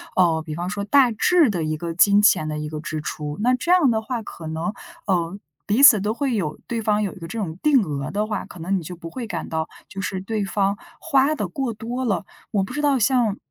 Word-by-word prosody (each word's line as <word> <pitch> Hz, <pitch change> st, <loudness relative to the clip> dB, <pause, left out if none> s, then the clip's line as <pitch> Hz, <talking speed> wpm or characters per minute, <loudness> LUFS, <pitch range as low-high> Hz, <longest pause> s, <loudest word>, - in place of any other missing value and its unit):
呃， 165 Hz, -3 st, +3 dB
比 155 Hz, -, -5 dB
方 175 Hz, +3 st, -3 dB
说 200 Hz, 0 st, -3 dB
大 250 Hz, +3 st, +4 dB
致 315 Hz, +5 st, +3 dB
的 175 Hz, -5 st, -1 dB
一 155 Hz, 0 st, -1 dB
个 170 Hz, +1 st, -4 dB
金 200 Hz, +3 st, +5 dB
钱 155 Hz, -7 st, +4 dB
的 150 Hz, 0 st, -3 dB
一 150 Hz, 0 st, -4 dB
个 155 Hz, -1 st, -5 dB
支 155 Hz, -1 st, -4 dB
出， 150 Hz, -1 st, -5 dB
那 250 Hz, +2 st, +3 dB
这 340 Hz, +7 st, -1 dB
样 350 Hz, -8 st, +5 dB
的 220 Hz, -, +1 dB
话 235 Hz, 0 st, -4 dB
可 165 Hz, -, -10 dB
能， 160 Hz, +6 st, -3 dB, 0.3 s
呃， 175 Hz, 0 st, 0 dB, 0.3 s
彼 225 Hz, +7 st, +2 dB
此 220 Hz, -8 st, +9 dB
都 210 Hz, +3 st, -1 dB
会 270 Hz, 0 st, -1 dB
有 155 Hz, -7 st, -2 dB
对 230 Hz, -1 st, -2 dB
方 210 Hz, -1 st, +1 dB
有 195 Hz, -, -2 dB
一 195 Hz, -, -13 dB
个 165 Hz, -, -7 dB
这 225 Hz, -, -6 dB
种 175 Hz, -5 st, -4 dB
定 280 Hz, -7 st, +4 dB
额 145 Hz, -3 st, -4 dB
的 210 Hz, +5 st, -1 dB
话， 210 Hz, -2 st, -3 dB
可 -, -, -13 dB
能 190 Hz, +4 st, 0 dB
你 -, -, -9 dB
就 180 Hz, +3 st, -7 dB
不 165 Hz, -1 st, -9 dB
会 240 Hz, +1 st, -6 dB
感 170 Hz, -5 st, -5 dB
到， 160 Hz, 0 st, -2 dB, 0.2 s
就 195 Hz, -, -8 dB
是 190 Hz, 0 st, -3 dB
对 210 Hz, 0 st, -2 dB
方 200 Hz, 0 st, 0 dB, 0.2 s
花 285 Hz, -1 st, +2 dB
得 210 Hz, -, -2 dB
过 250 Hz, +3 st, -3 dB
多 245 Hz, +4 st, -4 dB
了。 200 Hz, -3 st, -1 dB, 0.3 s
我 200 Hz, -2 st, +1 dB
不 -, -, -6 dB
知 295 Hz, -, -2 dB
道 285 Hz, -2 st, +3 dB
像 235 Hz, -3 st, +2 dB
200 Hz, 275 characters per minute, -22 LUFS, 165-235 Hz, 0.3 s, 此